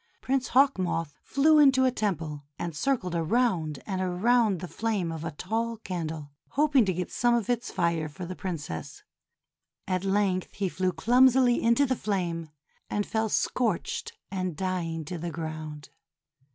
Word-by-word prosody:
Prince 265 -1 0
Hawk 270 -4 +4
Moth 165 -5 -2
flew 305 +2 +4
into 265 -3 +6
a 255 - +3
temple, 165 -10 -2
and 170 -2 -4
circled 185 - 0
around 170 - 0
and 190 -2 -2
around 200 +2 +2
the 180 - -5
flame 205 -5 -1
of 160 -1 -5
a 165 - -2
tall 225 +9 -2
candle, 160 -7 -5 0.2
hoping 280 -4 +3
to 190 - +1
get 180 0 -3
some 240 0 +2
of 235 0 0
its 240 0 -1
fire 170 -4 0
for 180 +4 -7
the 185 +1 -6
Princess, 150 - -5 0.8
at 185 -1 0
length 195 -2 0
he 195 -2 -1
flew 185 +1 0
clum 245 +10 +5
sily 245 -1 +3
into 235 +5 +4
the 260 -1 0
flame, 175 -7 -2 0.4
and 205 0 -1
fell 220 -1 -1
scorched 220 -3 -1 0.2
and 185 -4 -3
dying 170 -4 -2
to 175 +2 -5
the 170 +2 -3
ground. 155 -2 -6
185 Hz, 165 wpm, -28 LUFS, 165-235 Hz, 0.8 s, into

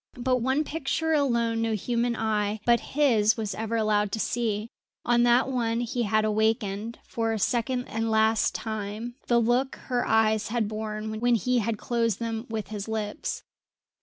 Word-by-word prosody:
But 255 +1 +1
one 260 +5 +1
picture 320 +1 -1
alone 235 -6 +1
no 225 -1 0
human 235 +3 0
eye 215 -1 0
but 235 -1 +5
his 230 -7 +2
was 215 -3 -2
ever 225 +3 -3
allowed 210 -2 +1
to 220 - -1
see; 220 -1 -1 0.3
on 240 0 +3
that 240 +2 +4
one 235 -3 0
he 240 +1 -2
had 215 -1 +2
awakened, 220 0 0
for 225 -1 -1
a - - -1
second 245 +4 0
and 225 +1 -2
last 220 0 +2
time, 220 +2 -4
the 240 - +4
look 245 +3 +1
her 245 -2 -2
eyes 220 -1 +3
had 225 -1 0
borne 215 0 -4
when 240 +1 +3
he 250 +3 +1
had 225 0 -1
closed 230 -2 0
them 230 0 -4
with 215 -3 -4
his 210 -1 -5
lips. 220 +4 -3
225 Hz, 170 wpm, -27 LUFS, 215-240 Hz, 0.3 s, but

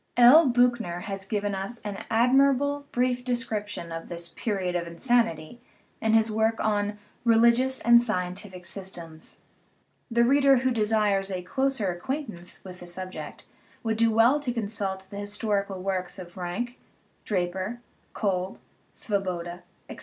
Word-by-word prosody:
L. 260 +5 +8
Biichner 240 -8 +2
has 195 -1 -5
given 205 -1 -1
us 195 +5 -3
an 205 -2 -5
admirable, 275 +4 +3
brief 250 0 +1
description 215 -8 -3
of 165 0 -6
this 170 0 -4
"period 185 -2 -2
of 170 -1 -1
insanity" 230 +1 0 0.4
in 220 0 +3
his 220 0 +4
work 220 +1 +2
on 210 -1 0 0.3
Religious 235 +3 +4
and 235 0 +7
Scientific 185 -3 -3
Systems. 170 -4 -7 0.7
The 235 0 +3
reader 275 +1 +5
who 260 +1 +1
desires 210 -3 +1
a 185 -2 -4
closer 265 -1 0
acquaintance 210 - -5
with 185 -1 -10
the 175 - -10
subject 185 +1 -6 0.4
would 225 -1 0
do 230 0 +4
well 230 +6 +4
to 275 -4 -2
consult 200 -4 -3
the 200 - -6
historical 205 -2 -2
works 185 -2 -2
of 175 -2 -10
Ranke, 195 +7 -4 0.4
Draper, 190 +3 -2 0.4
Kolb, 190 -3 -1 0.4
Svoboda, 180 -4 -3 0.3
etc. - - -9
210 Hz, 140 wpm, -27 LUFS, 185-240 Hz, 0.7 s, L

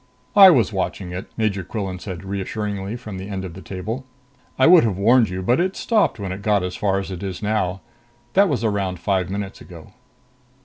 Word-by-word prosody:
"I 195 -2 +10
was 120 - +3
watching 95 -1 -3
it," 90 +2 -6
Major 105 -4 0
Quillan 95 -1 -4
said 90 -3 -7
reassuringly 100 +1 -4
from 110 -6 -7
the 95 +2 -7
end 95 -2 -4
of 90 - -8
the 95 - -10
table. 105 +8 -5 0.5
"I 130 - +4
would 175 0 +8
have 105 -5 0
warned 115 +3 +4
you, 90 +1 -4
but 120 - +2
it 185 +2 0
stopped 220 - +1
when 95 -2 -4
it 95 +2 -6
got 105 -2 +2
as 90 0 -4
far 100 -2 0
as 95 0 -4
it 90 - -6
is 95 +1 -5
now. 95 -3 -1 0.5
That 200 0 +5
was 125 -7 -1
around 100 -4 -1
five 95 0 -1
minutes 100 0 -5
ago." 85 -3 -13
100 Hz, 210 wpm, -22 LUFS, 95-110 Hz, 0.5 s, I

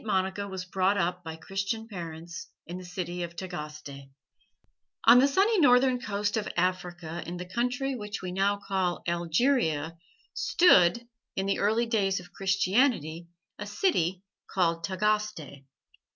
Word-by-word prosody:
MONICA 190 -1 -1
WAS 190 -2 -5
BROUGHT 190 +2 +1
UP 180 -1 -1
BY 160 -1 -6
CHRISTIAN 195 +6 -3
PARENTS 170 -4 -7 0.2
IN 175 +2 -6
THE 185 - -10
CITY 180 0 -4
OF 170 -1 -5
TAGASTE 150 -6 -7 1.0
On 235 +2 +9
the 270 - +5
sunny 390 +9 +3
northern 250 -3 +5
coast 210 -1 -1
of 215 - -2
Africa 175 -2 -2
in 175 +1 -5
the 180 - -6
country 250 +7 -1
which 210 -3 -5
we 185 -1 -5
now 195 +2 +1
call 190 -3 -2
Algeria 170 - +1 0.3
stood, 235 - +4 0.3
in 190 - -1
the 195 - 0
early 220 +4 +2
days 200 -5 +1
of 180 -1 -14
Christianity, 190 - +1 0.3
a 205 - -5
city 190 - 0 0.3
called 170 -3 +1
Tagaste. 195 -8 -1
190 Hz, 140 wpm, -28 LUFS, 175-215 Hz, 1.0 s, On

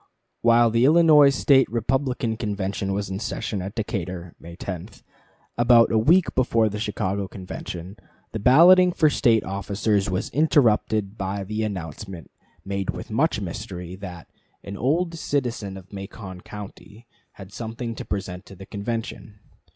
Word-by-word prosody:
While 115 0 +5
the 115 +2 +2
Illinois 150 -1 +7
State 135 -1 +3
Republican 120 0 -1
Convention 100 -3 -3
was 100 0 -3
in 95 - -3
session 105 -2 -3
at 95 +3 -6
Decatur 90 -5 -4
(May 85 +1 -11
10), 90 +1 -6 0.7
about 120 -1 +5
a 115 - +3
week 165 +10 +3
before 115 -3 +2
the 105 +1 -5
Chicago 100 -2 -2
Convention, 90 0 -8 0.3
the 110 - -4
balloting 175 - +6
for 155 -3 +3
State 115 -4 +3
officers 100 +1 -1
was 95 +1 -2
interrupted 110 -8 +2
by 100 +1 -3
the 105 +3 -3
announcement, 95 -4 -6 0.3
made 100 -1 -3
with - - -5
much - - +1
mystery, 90 0 -6
that 90 -4 -9 0.4
"an 100 - -7
old 165 - 0
citizen 120 -11 -3
of 95 +1 -14
Macon 95 -1 -8
County" 105 +2 -11 0.3
had 100 0 -12
something 115 +1 -5
to - - -7
present 95 -2 -5
to 95 - -12
the 95 +1 -11
convention. 105 0 -5
105 Hz, 145 wpm, -24 LUFS, 95-120 Hz, 0.7 s, Illinois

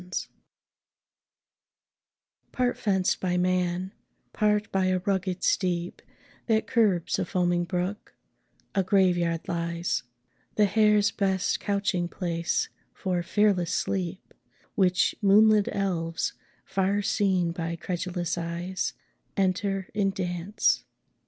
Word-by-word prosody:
] - - -1 2.3
Part 250 -1 0
fenced 190 -4 +1
by 180 -1 0
man, 180 0 0 0.4
part 210 -1 +1
by 190 -1 +1
a 185 0 +2
rugged 190 -1 -1
steep 175 -2 0 0.5
That 220 -1 +2
curbs 205 -8 +2
a - - +1
foaming 175 -2 +1
brook, 180 +4 -3 0.6
a 195 - +2
Grave 190 -1 +3
yard 170 -1 -1
lies; 170 -2 -1 0.5
The 210 - +5
hare's 210 0 +4
best 190 -2 0
couching 200 -3 0
place 170 -2 -1 0.3
for 180 -2 -1
fearless 190 -2 +2
sleep; 185 -1 -3 0.4
Which 180 -2 +3
moonlit 210 +1 +5
elves, 170 -5 -1 0.3
far 195 +1 0
seen 190 -4 +1
by 165 0 -3
credulous 175 0 -3
eyes, 170 +2 -3 0.4
Enter 195 0 0
in 200 -2 +1
dance. 185 +1 0
185 Hz, 105 wpm, -27 LUFS, 175-200 Hz, 2.3 s, The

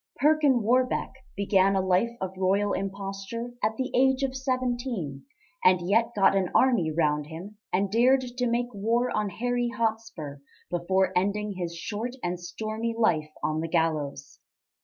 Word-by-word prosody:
Perkin 290 -5 +3
Warbeck 255 +3 +1 0.3
began 195 -1 +3
a - - +3
life 185 +5 +3
of 190 0 -4
royal 195 +2 +1
imposture 195 +4 -4
at 220 +1 +1
the 260 0 -2
age 265 +1 +3
of 265 -1 -1
seventeen 245 - -2 0.4
and 180 -1 +4
yet 230 +4 +2
got 195 -1 +4
an 190 -2 +1
army 240 -11 +4
round 150 -2 0
him 185 +6 -9
and 195 +1 +1
dared 255 +4 +4
to 250 0 -2
make 240 +1 -1
war 230 +5 0
on 210 -1 0
Harry 245 +4 -1
Hotspur 220 - -3 0.3
before 185 +2 +1
ending 205 +3 0
his 175 -3 -4
short 220 +8 -4
and 175 0 -2
stormy 215 +6 -4
life 160 -9 +2
on 155 0 0
the 165 - -2
gallows. 155 -4 -1
205 Hz, 155 wpm, -27 LUFS, 180-240 Hz, 0.4 s, and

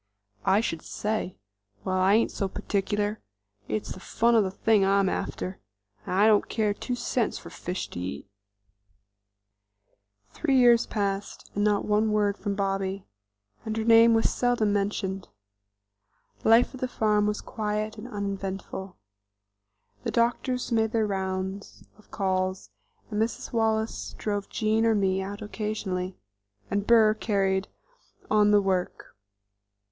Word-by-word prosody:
"I 195 +3 +4
should 165 -8 -3
say? 210 -3 -3 0.5
Well, 185 - -2
I 190 +2 +4
ain't 230 - +2
so 195 - -2
particular; 205 +1 -2 0.5
it's 105 -1 -3
the - - -7
fun 235 +5 +1
of 225 -2 +5
the 190 - -1
thing 210 +2 +2
I'm 195 0 +3
after. 185 0 -3 0.5
I 195 +3 +3
don't 215 -2 +4
care 215 -2 +1
two 245 +4 -4
cents 245 -1 -1
for - - -11
fish 180 +1 -4
to - - -7
eat." 90 -3 -5 2.0
Three 275 -5 +1
years 240 -2 +5
passed, 200 -1 -3
and 205 - 0
not 205 -1 +2
one 215 +1 +2
word 205 -1 +2
from 205 -1 -3
Bobby, 195 -1 -2 0.6
and 220 -1 -3
her 220 - 0
name 230 0 +6
was 225 - +2
seldom 240 -4 +1
mentioned. 195 -1 -2 1.2
Life 230 +4 +5
at 260 - -10
the 255 - 0
farm 210 -3 +1
was 210 0 -1
quiet 215 0 -3
and 235 - -8
uneventful. 195 -3 -5 1.1
The - - -2
doctors 245 +2 0
made 220 -1 +1
their 225 -2 +2
rounds 190 0 -4 0.2
of 210 - -22
calls, 185 -1 -1 0.4
Mrs. 220 +4 -2
Wallace 220 - 0
drove 205 - -3
Jean 220 +1 +1
or 225 -1 +3
me 190 -2 +1
out 200 +2 -6
occasionally, 205 -4 -3 0.5
and 200 0 -1
Burr 225 -2 +6
carried 195 -3 0 0.6
on 210 -1 +5
the 205 -1 +5
work. 185 -2 -2
205 Hz, 140 wpm, -27 LUFS, 195-220 Hz, 2.0 s, name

